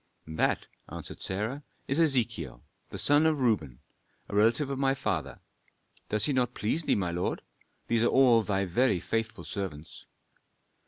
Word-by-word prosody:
"That," 80 0 0 0.3
answered - - -8
Sarah, 110 +9 -3 0.3
"is 140 +3 +1
Ezechiel, 115 - +1 0.3
the - - -7
son 145 +2 +4
of 155 -2 +1
Reuben, 95 - 0 0.5
a - - -5
relative 115 +7 +3
of 135 - -3
my 135 0 +2
father. - - -3 0.7
Does 105 - +2
he 145 - +1
not 125 -2 0
please 115 +10 0
thee, - - +3
my 90 -4 -1
lord? 90 +1 -2 0.4
These 115 -1 +2
are 120 - +4
all 125 -4 +5
thy 100 -2 -1
very 95 +2 +2
faithful 115 +4 -3
servants." 85 -7 -6
115 Hz, 155 wpm, -29 LUFS, 95-135 Hz, 0.7 s, all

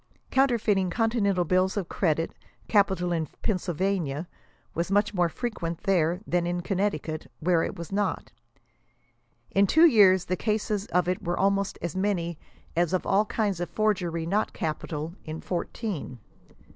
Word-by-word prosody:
Counter 265 -2 +4
feiting 195 -4 +1
continental 200 -4 +1
bills 185 +4 +2
of 190 -4 -2
credit, 165 -3 0 0.3
capital 190 -4 +2
in 165 -2 0 0.2
Pennsylvania, 180 -5 -1 0.5
was 170 +2 -2
fnuch 205 +2 +2
more 175 -3 +2
frequent 170 -6 -4
there 180 -3 +2
than 175 0 0
in 175 0 -1
Connecticut, 175 -5 -2
where 170 0 +2
it - - -2
was 170 +1 -8
not. 195 -3 -1 1.2
in 200 +1 +4
two 320 - +6
years 200 - +6
the 185 - 0
cases 210 0 -1
of 180 0 +1
it 180 +1 -1
were 175 -1 -1
almost 200 0 +1
as 170 -1 -3
many 175 -4 -1 0.4
as 175 +1 +1
of 185 - 0
all 200 +2 +3
kinds 205 -4 -1
of 175 - -3
forgery 180 -6 0
not 205 +6 0
capital, 155 +1 -3
in 155 +1 -6
fourteen. 180 - -4
185 Hz, 150 wpm, -27 LUFS, 170-205 Hz, 1.2 s, two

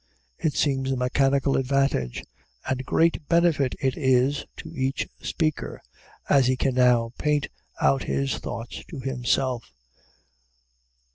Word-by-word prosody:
It 155 - 0
seems 135 -2 +1
a 130 - 0
mechanical 135 +2 +2
advantage, 135 - 0 0.4
and 130 0 -1
great 165 -2 +2
benefit 165 -6 +2
it 130 -1 0
is 130 -1 +2
to - - -9
each 135 0 -1
speaker, 155 -3 -2 0.5
as 135 -3 +4
he 130 0 +2
can 130 0 +1
now 125 -2 +3
paint 150 -1 +1 0.3
out 70 -1 +2
his 70 0 -1
thought 115 +1 -6 0.2
to 155 - -7
himself. 125 - -1
135 Hz, 125 wpm, -25 LUFS, 125-140 Hz, 0.5 s, as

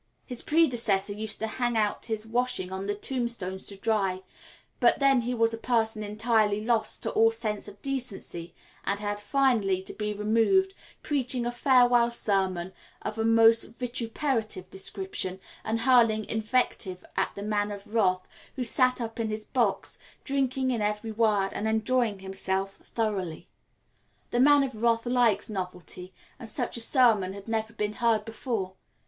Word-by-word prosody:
His 250 -2 -3
predecessor 235 -11 +2
used 215 +1 -3
to - - +1
hang 240 +1 -1
out 210 -1 0
his 220 -1 -2
washing 235 -5 -1
on 190 +1 -4
the 205 - -1
tombstones 225 -5 -2
to 200 - -3
dry, 195 -3 0 0.6
but - - +5
then 275 -2 +5
he 245 +1 -2
was 230 -1 +2
a 225 - -5
person 225 -2 +1
entirely 215 0 +1
lost 230 -2 +1
to - - -2
all 225 0 +4
sense 225 -2 -3
of 205 -1 -12
decency, 240 -10 -4 0.3
and 200 +1 -1
had 205 0 -3
finally 215 -5 +1
to - - -6
be 210 -1 -3
removed, 230 - +2 0.3
preaching 255 -4 +1
a 240 - -1
farewell 245 -1 +4
sermon 190 -5 -1 0.3
of 220 - -4
a - - +1
most 225 0 +6
vituperative 230 -4 -3
description, 190 -1 -1 0.2
and 225 +1 -1
hurling 230 -4 +4
invective 215 -4 -1
at - - -1
the 200 - -6
Man 205 -1 0
of 205 +1 -9
Wrath, 185 -5 +1 0.3
who 255 - -2
sat 255 +1 +4
up 230 -1 -5
in 225 -1 -1
his 215 0 -4
box - - 0 0.2
drinking 265 -1 0
in 235 -3 -1
every 210 +2 -2
word 210 -3 +2
and 215 - -2
enjoying 220 0 +1
himself 190 0 -3 0.2
thoroughly. 200 -8 -2 0.8
The 240 - +1
Man 285 +2 +6
of 250 -5 -5
Wrath 230 0 +2
likes 240 -5 +2
novelty, 180 -2 -6 0.3
and 230 -3 -7
such 245 +3 -1
a 235 - +1
sermon 225 -7 +3
had 200 +1 -10
never 225 0 -2
been 210 -1 -2
heard 225 -2 +1
before. 225 -4 -4
220 Hz, 160 wpm, -27 LUFS, 205-240 Hz, 0.8 s, most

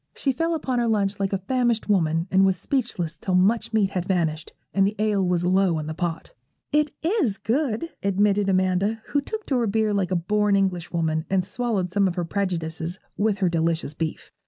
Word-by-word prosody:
She 275 - 0
fell 330 +6 0
upon 260 -5 -1
her 235 - +1
lunch 205 -3 0
like 195 -1 0
a 195 - +1
famished 235 +3 0
woman, 165 -4 +1
and 190 +1 +5
was 190 -1 +3
speechless 190 - -2
till 185 +3 -1
much 215 +5 +2
meat 210 -3 +2
had 180 -1 -3
vanished, 165 -4 -1 0.2
and 195 0 +3
the 210 - -3
ale 210 -2 +1
was 180 -1 +1
low 185 -2 +3
in 155 - -3
the 155 - -4
pot. 165 0 -4 0.4
'It 300 +1 +3
is 325 - +1
good,' 240 +5 -1
admitted 200 +1 +2
Amanda, 190 +4 +1
who 285 - +1
took 435 +9 -6
to 265 - 0
her 235 - +1
beer 215 0 +1
like 195 -3 0
a 185 - 0
born 205 +4 +2
Englishwoman, 170 -4 0
and 190 -2 +1
swallowed 210 -6 -1
some 200 0 +3
of 180 - -2
her 175 -2 -1
prejudices 170 -2 -3 0.2
with 210 -1 +1
her 185 - +4
delicious 165 -2 0
beef. 160 +1 -4
195 Hz, 205 wpm, -24 LUFS, 175-220 Hz, 0.4 s, and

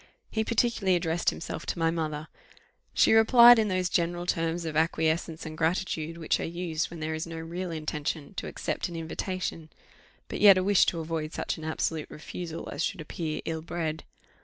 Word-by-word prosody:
He 220 - 0
particularly 225 -4 +2
addressed 170 0 +1
himself - - -6
to - - -2
my 165 -1 +2
mother; 155 -2 -3 0.6
she - - +4
replied 235 +1 +8
in 215 - +2
those 185 -2 0
general 175 0 0
terms 165 0 -1
of 160 -2 -4
acquiescence 160 +1 0
and 155 0 -6
gratitude, 165 -1 -1
which 160 -2 0
are - - -2
used 170 -1 -2
when 170 -2 -9
there 155 0 -2
is 160 +1 -4
no 165 0 -6
real 170 +3 -5
intention 155 0 -4
to - - -3
accept - - -3
an 170 - -7
invitation, 165 0 -4 0.6
but - - -5
yet 200 -2 +9
a 185 - +1
wish 200 0 +4
to 170 - 0
avoid 160 -1 -3
such - - -3
an - - -9
absolute 160 0 -2
refusal 165 +1 -7
as - - -2
should 195 - -2
appear 155 0 -4
ill 160 -1 -3
bred. 160 -1 -3
165 Hz, 185 wpm, -28 LUFS, 160-180 Hz, 0.6 s, yet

